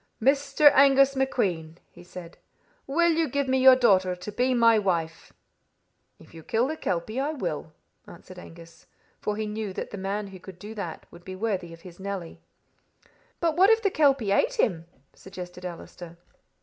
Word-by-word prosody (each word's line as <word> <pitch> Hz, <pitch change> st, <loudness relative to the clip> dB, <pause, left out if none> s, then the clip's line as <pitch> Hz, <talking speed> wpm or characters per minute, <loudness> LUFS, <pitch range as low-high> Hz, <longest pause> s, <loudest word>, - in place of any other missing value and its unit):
'Mr. 280 Hz, +3 st, +4 dB
Angus 275 Hz, 0 st, +5 dB
MacQueen,' 180 Hz, -12 st, -1 dB
he -, -, -15 dB
said, 175 Hz, -1 st, -11 dB, 0.5 s
'will 340 Hz, +5 st, +2 dB
you 325 Hz, -1 st, 0 dB
give 280 Hz, -1 st, -1 dB
me 260 Hz, 0 st, +1 dB
your 260 Hz, 0 st, +8 dB
daughter 190 Hz, -7 st, +3 dB
to 180 Hz, +4 st, -8 dB
be 250 Hz, +4 st, 0 dB
my 230 Hz, -2 st, +5 dB
wife?' 170 Hz, -5 st, -3 dB, 0.9 s
'If -, -, -19 dB
you 165 Hz, -, -11 dB
kill 225 Hz, +9 st, 0 dB
the 315 Hz, -, -3 dB
kelpie, 200 Hz, -, -3 dB
I 290 Hz, +3 st, -1 dB
will,' 170 Hz, -, -5 dB, 0.4 s
answered 180 Hz, +1 st, -13 dB
Angus; 165 Hz, -1 st, -15 dB, 0.3 s
for 210 Hz, 0 st, -3 dB
he 215 Hz, -, -2 dB
knew 210 Hz, -2 st, -5 dB
that -, -, -6 dB
the 200 Hz, -, -7 dB
man 200 Hz, +1 st, -3 dB
who 190 Hz, -1 st, -11 dB
could 185 Hz, 0 st, -12 dB
do 210 Hz, +3 st, -9 dB
that 190 Hz, -7 st, -7 dB
would 170 Hz, 0 st, -15 dB
be 185 Hz, +1 st, -8 dB
worthy 190 Hz, -4 st, -3 dB
of 165 Hz, 0 st, -13 dB
his 175 Hz, 0 st, -13 dB
Nelly." 190 Hz, -3 st, -6 dB, 1.0 s
"But 330 Hz, -2 st, 0 dB
what 380 Hz, +4 st, +5 dB
if 450 Hz, 0 st, +3 dB
the 400 Hz, -, +2 dB
kelpie 275 Hz, -, +2 dB
ate 485 Hz, -, +2 dB
him?" 175 Hz, -, 0 dB, 0.3 s
suggested 180 Hz, -1 st, -10 dB
Allister. 170 Hz, -1 st, -9 dB
205 Hz, 175 wpm, -26 LUFS, 180-270 Hz, 1.0 s, your